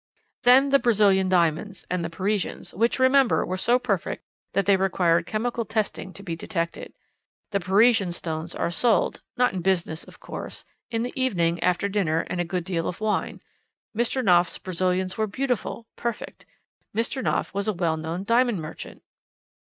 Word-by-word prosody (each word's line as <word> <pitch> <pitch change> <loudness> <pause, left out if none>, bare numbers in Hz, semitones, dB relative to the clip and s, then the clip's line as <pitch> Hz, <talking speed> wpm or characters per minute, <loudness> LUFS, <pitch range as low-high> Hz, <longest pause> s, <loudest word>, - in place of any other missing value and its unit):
"Then 260 +3 +6
the 275 0 +5
Brazilian 200 -6 +3
diamonds, 180 +2 +1
and 180 -1 -2
the 165 - -3
Parisians 195 +3 -2
which, 230 +6 +1
remember, 260 0 +4
were 185 - -2
so 235 +6 +3
perfect 225 -8 -2 0.3
that 195 - +1
they 200 - +5
required 180 -3 +2
chemical 230 +2 -1
testing 215 -3 -3
to 200 - -11
be 170 -4 -4
detected. 170 0 -4 0.6
The 200 - +1
Parisian 200 +1 +3
stones 165 -1 -4
are - - -1
sold 230 +5 +1 0.2
not 250 -3 +3
in 185 - -3
business, 170 -3 0
of - - -16
course - - -8 0.2
in 230 -1 -1
the 250 - -4
evening, 175 -10 +1
after 180 +2 +1
dinner 180 -6 +1
and 180 - -1
a - - +1
good 180 +1 -3
deal 165 -2 -2
of 180 - -4
wine. 215 -1 -2 0.5
Mr. 240 +2 0
Knopf's 175 -2 +4
Brazilians 185 +1 -1
were 215 - +1
beautiful; 245 0 -2
perfect! 235 -2 -5 0.5
Mr. 235 +4 -1
Knopf - - -1
was 200 +1 -1
a 215 - +1
well 170 -3 0
known 160 +3 -4
diamond 235 -1 +2
merchant. 155 0 -8
195 Hz, 165 wpm, -25 LUFS, 175-230 Hz, 0.6 s, Then